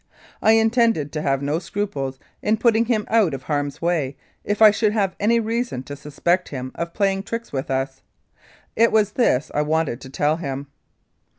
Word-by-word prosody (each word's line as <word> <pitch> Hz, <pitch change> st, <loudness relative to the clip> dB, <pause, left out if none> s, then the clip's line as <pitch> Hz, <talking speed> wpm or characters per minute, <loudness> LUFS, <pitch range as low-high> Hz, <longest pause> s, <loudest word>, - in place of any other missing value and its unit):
I 220 Hz, -, +5 dB
intended 225 Hz, -, +2 dB
to 155 Hz, -, -3 dB
have 135 Hz, -1 st, 0 dB
no 145 Hz, +3 st, 0 dB
scruples 170 Hz, -8 st, -3 dB, 0.2 s
in 215 Hz, +1 st, +1 dB
putting 230 Hz, 0 st, +3 dB
him 220 Hz, -3 st, 0 dB
out 210 Hz, -10 st, +3 dB
of 130 Hz, -, -9 dB
harm's 145 Hz, +1 st, -2 dB
way 150 Hz, -6 st, 0 dB, 0.3 s
if 205 Hz, 0 st, -2 dB
I 215 Hz, -1 st, +9 dB
should 215 Hz, 0 st, +1 dB
have 195 Hz, -4 st, 0 dB
any 230 Hz, +3 st, +3 dB
reason 230 Hz, -, -2 dB
to 145 Hz, +2 st, -7 dB
suspect 170 Hz, +5 st, -1 dB
him 130 Hz, -2 st, -5 dB
of 170 Hz, 0 st, -5 dB
playing 195 Hz, -2 st, +1 dB
tricks 230 Hz, +3 st, -6 dB
with 135 Hz, -1 st, -3 dB
us. 135 Hz, 0 st, -2 dB, 0.7 s
It 230 Hz, +1 st, +4 dB
was 210 Hz, -2 st, +3 dB
this 155 Hz, -, +1 dB
I 150 Hz, -, +1 dB
wanted 150 Hz, -4 st, 0 dB
to 130 Hz, -, -10 dB
tell 150 Hz, +3 st, +1 dB
him. 140 Hz, -4 st, -4 dB
170 Hz, 185 wpm, -22 LUFS, 140-220 Hz, 0.7 s, I